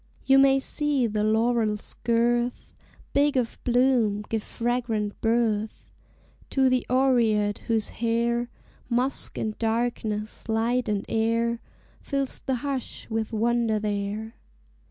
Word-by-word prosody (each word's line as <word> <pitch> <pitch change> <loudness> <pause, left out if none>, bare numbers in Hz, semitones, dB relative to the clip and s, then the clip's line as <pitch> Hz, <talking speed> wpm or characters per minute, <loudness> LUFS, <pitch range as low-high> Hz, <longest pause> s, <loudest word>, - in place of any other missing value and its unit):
You 270 0 +6
may 270 0 +5
see 290 -2 0
the 210 -2 -1
laurel's 220 -1 +1
girth, 240 +1 +1 0.4
Big 285 -1 +3
of 240 -3 -1
bloom, 240 -4 +2
give 220 -1 -1
fragrant 230 -3 -2
birth 225 -2 0 0.6
To 265 -1 +3
the 255 -1 +1
oread 235 -5 +2
whose 225 -2 0
hair, 235 +1 0 0.4
Musk 250 +3 -1
and 215 -1 -2
darkness, 225 -2 -2
light 230 +2 +1
and 205 -2 -1
air, 230 +1 +1 0.4
Fills 275 -2 -3
the 265 - -1
hush 270 -3 -4
with 220 0 -1
wonder 230 0 +1
there. 210 +1 -3
230 Hz, 115 wpm, -26 LUFS, 220-250 Hz, 0.6 s, You